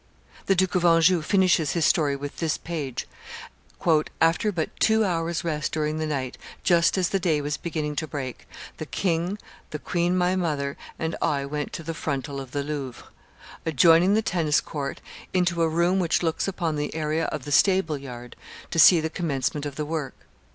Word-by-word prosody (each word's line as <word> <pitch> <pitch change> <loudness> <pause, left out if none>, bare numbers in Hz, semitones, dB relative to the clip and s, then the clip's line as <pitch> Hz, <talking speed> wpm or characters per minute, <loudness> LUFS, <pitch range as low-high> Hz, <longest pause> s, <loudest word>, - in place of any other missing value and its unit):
The 195 - +4
Duke 185 0 +1
of 180 -2 +1
Anjou 165 0 +5
finishes 180 -3 +2
his 170 -3 +1
story 145 -4 +2
with 140 +1 -7
this 165 -2 0
page 150 -7 -5 1.1
"After 165 +6 +3
but 165 -5 -2
two 220 0 +4
hours' 170 -2 -1
rest 155 -3 -2
during 155 0 -1
the 155 - -1
night, 135 -4 -3 0.2
just 170 +1 +3
as 180 -2 +1
the 195 - 0
day 165 -4 +1
was 145 0 -2
beginning 155 -3 -3
to 155 - -1
break, 135 -4 -6 0.3
the - - -6
king, 175 +1 -1 0.3
the 150 - -4
queen 175 +4 0
my 180 +1 +2
mother, 150 -6 -1 0.2
and 160 0 -2
I 140 -2 0
went 145 +1 -4
to 165 - -5
the 165 +1 -4
frontal 140 -3 -3
of 135 - -9
the 140 +2 -2
Louvre, 140 -4 -6 0.5
adjoining 165 +5 +5
the 220 - +2
tennis 160 -6 +1
court, 140 -3 -5 0.3
into 175 -2 +2
a 165 - +3
room 170 +4 +2
which 175 -1 +1
looks 165 +2 0
upon 170 -5 -2
the 150 +1 -3
area 160 +1 -1
of 150 -4 -4
the 145 - -6
stable 165 -1 +3
yard, 125 -3 -9 0.4
to 165 - 0
see 170 0 +8
the 160 - -2
commencement 145 -3 -2
of 140 - -7
the 150 - -3
work. 155 -3 -4
160 Hz, 185 wpm, -25 LUFS, 145-175 Hz, 1.1 s, see